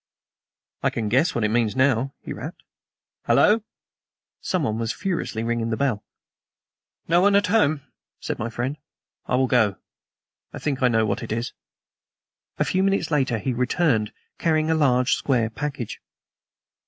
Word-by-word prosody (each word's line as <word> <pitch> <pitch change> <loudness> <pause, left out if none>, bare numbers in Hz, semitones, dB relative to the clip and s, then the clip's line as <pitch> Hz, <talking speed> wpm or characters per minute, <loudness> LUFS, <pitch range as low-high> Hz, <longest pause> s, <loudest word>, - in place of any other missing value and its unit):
"I - - +2
can 110 -2 -3
guess 135 - +2
what 115 - 0
it 105 - +1
means 115 -1 +1
now," 130 0 +2
he - - -5
rapped. - - -8 0.6
"Hallo!" 215 +2 +4 0.8
Someone 135 - -1
was 115 -1 -1
furiously 170 - -3
ringing 115 0 -1
the 110 - -1
bell. 125 -7 0 1.0
"No 170 +2 +4
one 200 +1 +4
at 200 +1 +4
home?" 155 -8 +2 0.4
said - - -4
my 115 - -2
friend. 125 +5 -3 0.5
"I - - +1
will 130 +1 +3
go. 115 -6 +3 0.8
I - - -6
think 140 -2 -2
I 125 - +5
know 115 -2 +2
what - - -1
it - - -6
is." 115 +2 -2 1.0
A - - +1
few 185 - +1
minutes 195 -4 +1
later 135 -6 +1
he 125 +5 -2
returned, 125 -3 +1 0.3
carrying 155 -1 +2
a - - +4
large 130 -5 +3
square 120 -5 +1
package. 135 -1 -5
130 Hz, 155 wpm, -24 LUFS, 115-155 Hz, 1.0 s, I